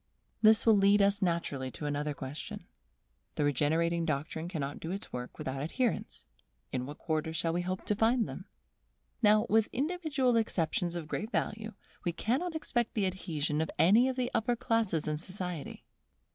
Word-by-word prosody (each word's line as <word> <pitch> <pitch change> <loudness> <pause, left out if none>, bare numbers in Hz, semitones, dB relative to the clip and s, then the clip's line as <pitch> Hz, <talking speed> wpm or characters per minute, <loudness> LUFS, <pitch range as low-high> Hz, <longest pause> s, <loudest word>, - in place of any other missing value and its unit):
This 220 -1 +6
will 225 -2 +7
lead 200 +1 +5
us 200 0 +3
naturally 170 -7 -1
to 130 +5 -7
another 145 0 -1
question. 135 +3 -7 0.7
The - - 0
regenerating 160 +4 +1
doctrine 160 +1 -2
cannot 145 -5 -4
do 165 - -6
its 195 +3 -5
work 125 0 -6
without 135 +1 -4
adherents; 225 - -2 0.5
in 130 0 -2
what 145 - -8
quarter 160 -1 -1
should 165 +1 0
we 175 +2 0
hope 185 +3 -3
to 210 - +1
find 225 +2 +3
them? - - -7 0.8
Now, 215 -1 +5
with 220 +1 +3
individual 285 -4 +1
exceptions 175 -5 0
of 165 -3 -4
great 210 +7 -3
value, 220 -2 -2 0.3
we 175 - -1
cannot 280 - -1
expect 240 -7 -1
the 210 -3 +2
adhesion 160 -5 -1
of 160 - -1
any 220 +10 +5
of 260 - -2
the 250 -1 -1
upper 240 +2 +1
classes 225 - 0
in 150 0 0
society. 180 -3 -5
180 Hz, 170 wpm, -31 LUFS, 155-225 Hz, 0.8 s, will